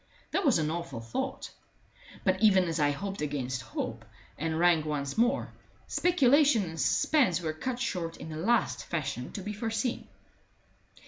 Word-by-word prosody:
That 395 - +1
was 275 -7 +4
an 155 -1 0
awful 170 -7 -4
thought; 115 0 -4 0.7
but 190 +1 +1
even 195 -4 +6
as 165 -2 -2
I 145 -1 +4
hoped 195 +5 -4
against 130 -4 -2
hope, - - -5 0.3
and 160 +1 -2
rang 170 -2 +4
once 145 -2 -3
more, 240 +4 +1 0.3
speculation 285 - +4
and 165 -3 -4
suspense 250 - +3
were 160 -3 -2
cut 240 +10 -3
short 175 -10 -3
in - - -8
the 155 - -6
last 225 +8 +1
fashion 135 -6 -3
to 195 - -5
be 210 +2 -4
foreseen. 225 +3 -2
175 Hz, 155 wpm, -29 LUFS, 155-230 Hz, 0.7 s, even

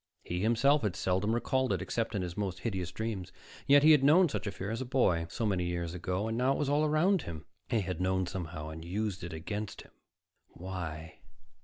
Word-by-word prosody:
He 90 - -3
himself 120 +7 +3
had 105 -5 -1
seldom 95 +3 0
recalled 130 +2 +1
it, - - -1
except 115 -1 -2
in 95 - 0
his 90 -1 -5
most 100 -3 -3
hideous 95 -6 -3
dreams, 95 -2 -4 0.4
yet 145 0 +7
he 155 - +8
had 150 -3 +6
known 165 +5 +6
such 140 - -3
fear 100 +1 -5
as 115 +2 -3
a - - 0
boy, 105 -11 +2
so 115 - -2
many 95 -4 +1
years 85 -1 -3
ago, 90 +4 -2
and 110 - -2
now 130 +3 +2
it - - -2
was 140 - 0
all 145 +2 +3
around 155 +5 +3
him. 80 -3 -7 0.2
They 115 -4 +2
had 90 -2 -3
known 95 0 +1
somehow 85 -4 -5
and 80 +1 -8
used 95 +1 -3
it 85 - -5
against 105 +6 -5
him. - - -20 0.6
Why? 85 -4 -7
100 Hz, 215 wpm, -31 LUFS, 90-125 Hz, 0.6 s, he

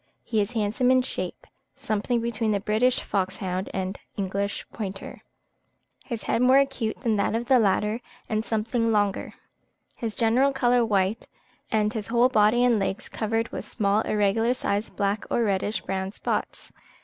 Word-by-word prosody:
He 220 -3 0
is 205 +4 -3
handsome 225 +3 +1
in 255 0 +4
shape, - - -5 0.3
something 225 +3 -1
between 225 -1 -1
the 200 - +1
British 220 +5 +2
foxhound 190 -1 -2
and 190 0 -3 0.2
English 200 +1 -2
pointer; 195 -3 -6 0.8
his 230 -5 -5
head 230 - 0
more 255 +2 +6
acute 270 -5 0
than 225 -4 +1
that 200 - +1
of 235 +1 -1
the 255 0 +5
latter, 210 +2 +1 0.3
and 215 0 -1
something 230 +1 0
longer: 205 -2 0 0.6
his 225 -3 -4
general 250 +4 +3
colour 245 -2 +3
white, 205 0 0 0.4
and 215 -1 +1
his 220 -3 -4
whole 240 +2 +4
body 220 0 +4
and 240 -3 +4
legs 195 +4 -3
covered 225 +1 -1
with - - -5
small 205 -1 +1
irregular 220 +3 +1
sized 205 -3 -2
black 200 0 0
or 235 - +1
reddish 205 0 0
brown 190 0 -3
spots. - - -3
220 Hz, 160 wpm, -26 LUFS, 200-235 Hz, 0.8 s, more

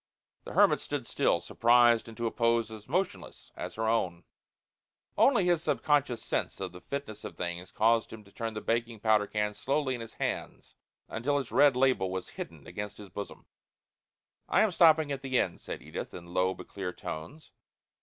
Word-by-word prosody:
The - - -7
hermit - - +5
stood - - -4
still, - - +1
surprised 120 -1 +4
into 115 +1 -5
a 115 - 0
pose 115 -1 +1
as 110 -1 -10
motionless 185 +6 -3
as - - -6
her 110 0 -1
own. 90 -7 0 0.9
Only 240 -9 +4
his 175 -2 +3
subconscious 145 -8 +1
sense - - -2
of 95 -2 -4
the 90 0 -12
fitness 125 -3 -6
of - - -8
things 90 +1 -4
caused 115 +1 +2
him 110 -1 -9
to 100 - -19
turn 115 0 -4
the 110 - -4
baking 115 -1 -1
powder 110 -2 +3
can 105 0 -1
slowly 135 +5 0
in 120 - -5
his 115 - -9
hands - - -4 0.3
until 140 +6 -1
its 135 -4 -3
red 140 -1 +5
label 130 -7 +2
was 95 0 -4
hidden - - -8
against 105 0 -6
his 100 -2 -10
bosom. 100 +3 -7 1.0
"I - - +4
am 220 - +3
stopping 160 -3 +5
at 135 -1 -3
the 130 -1 0
inn," 90 - 0
said - - -7
Edith, 80 +2 -6
in 85 0 -10
low 95 +1 +2
but - - -11
clear 95 -2 -4
tones. 90 - -8
115 Hz, 185 wpm, -30 LUFS, 100-135 Hz, 1.0 s, hermit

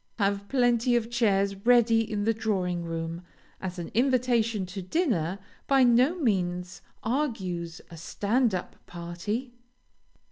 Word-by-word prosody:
Have 200 -1 0
plenty 245 -1 +2
of 235 -1 0
chairs 200 -4 +2
ready 230 +1 +4
in 205 -1 -1
the 225 +2 +2
drawing 185 -6 -1
room, 165 0 -4 0.4
as 185 -1 -5
an 175 - -6
invitation 240 -4 +2
to 185 +2 -6
dinner 185 - 0 0.3
by 270 -1 +5
no 250 +7 +4
means 180 - -1 0.2
argues 190 - -2
a 165 - -9
"stand 215 +6 0
up" 180 - -5
party. 175 +9 -5
210 Hz, 130 wpm, -27 LUFS, 180-240 Hz, 0.4 s, by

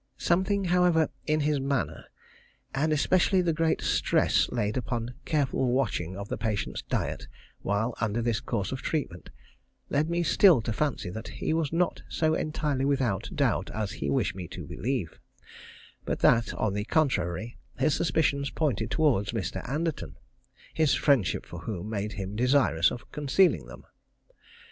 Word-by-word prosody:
Something, 190 +3 +1
however, 175 -3 +3 0.2
in 155 0 +2
his 150 -1 +1
manner, 135 -1 -2 0.7
and 150 +4 +1
especially 185 +5 +3
the 170 -2 +1
great 160 +1 +1
stress - - +2
laid 105 -3 -1
upon 120 -1 -3
careful 135 -4 +1
watching 95 -9 -1
of 100 0 -6
the - - -4
patient's 110 -3 -2
diet - - -3 0.3
while 105 +4 0
under 115 0 0
this 115 -1 0
course 100 -5 -3
of 130 - -4
treatment, 125 - -3 0.6
led 150 +3 +1
me 170 0 0
still 175 -2 +6
to 110 - -2
fancy 130 -9 -1
that 110 +4 -7
he - - -2
was 160 -3 0
not 170 +2 0
so 160 -1 +1
entirely 150 -4 -1
without 135 -8 0
doubt - - +1
as 105 -3 -2
he 70 - -4
wished 70 - +1
me 90 -2 -7
to - - -8
believe; 120 - -3 0.8
but - - -3
that, 115 0 +4
on 110 -3 0
the 105 +1 -2
contrary, 120 - 0 0.2
his 140 +3 +2
suspicions 140 -4 +1
pointed 120 -8 -1
towards 125 -10 +1
Mr. 100 -6 -3
Anderton, 155 +3 -3 0.6
his 155 -3 +3
friendship 135 - +2
for 85 - -8
whom 100 +2 -5
made 105 0 -3
him 95 0 -5
desirous 125 - +3
of 120 - -9
concealing 150 +6 +2
them. - - -12
130 Hz, 155 wpm, -28 LUFS, 105-155 Hz, 0.8 s, still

